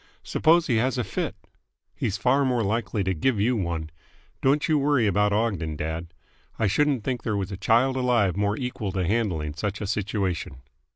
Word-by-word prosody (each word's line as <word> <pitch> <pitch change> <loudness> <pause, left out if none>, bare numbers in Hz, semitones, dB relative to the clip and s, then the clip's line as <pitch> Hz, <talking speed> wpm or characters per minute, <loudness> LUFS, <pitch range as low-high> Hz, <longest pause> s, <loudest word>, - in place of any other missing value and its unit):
"Suppose 165 +1 +3
he 120 -7 +1
has 130 +3 +1
a 125 - 0
fit!" - - -3 0.6
"He's 105 - -2
far 135 +3 +3
more 125 -3 +1
likely 105 0 -1
to 95 0 0
give 110 +7 0
you 120 +5 +2
one. 85 -6 -3 0.5
Don't 140 +2 +2
you 155 -2 +3
worry 140 -4 +2
about 105 0 +2
Ogden, 100 -8 0
dad. 80 +3 -4 0.5
I 110 - +1
shouldn't 135 +3 +2
think 125 -1 -2
there 105 -2 -1
was 100 0 -3
a - - -3
child 115 +7 +2
alive 120 -8 +2
more 100 +1 0
equal 125 -6 -3
to 95 -2 0
handling 90 -8 -1
such 100 +6 -3
a 105 - -3
situation." 95 - -2
105 Hz, 185 wpm, -25 LUFS, 95-125 Hz, 0.6 s, Suppose